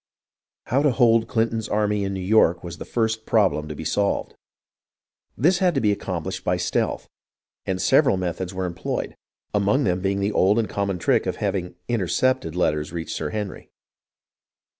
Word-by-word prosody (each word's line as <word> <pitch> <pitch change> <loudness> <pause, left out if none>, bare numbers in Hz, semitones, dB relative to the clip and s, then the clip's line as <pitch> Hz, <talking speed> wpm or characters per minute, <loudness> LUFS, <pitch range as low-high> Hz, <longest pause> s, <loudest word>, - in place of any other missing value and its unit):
How 130 +3 +1
to 145 - +4
hold 115 -3 +3
Clinton's 115 -2 -1
army 105 -1 +1
in 100 0 -2
New 95 - -4
York 90 -3 +3
was 85 -1 -7
the - - -6
first 110 -1 -1
problem 95 -8 +2
to 75 - -6
be 80 - -7
solved. 100 +5 0 1.0
This 175 - +3
had 180 -4 +2
to - - +3
be 105 -4 +2
accomplished 90 -5 -4
by - - +1
stealth, - - -1 0.6
and 95 -1 -1
several 95 - +4
methods 90 0 -3
were 95 -1 -3
employed, 85 -1 -4 0.4
among 105 +7 +2
them 90 -3 0
being 100 +1 0
the 100 +1 0
old 100 +2 +3
and 115 -2 +1
common 100 -2 -2
trick 85 - +1
of - - -1
having 95 -3 -2
"intercepted" 115 -4 0
letters 75 -4 0
reach 85 -1 -5
Sir 75 - -3
Henry. 105 0 -5
100 Hz, 170 wpm, -23 LUFS, 90-110 Hz, 1.0 s, to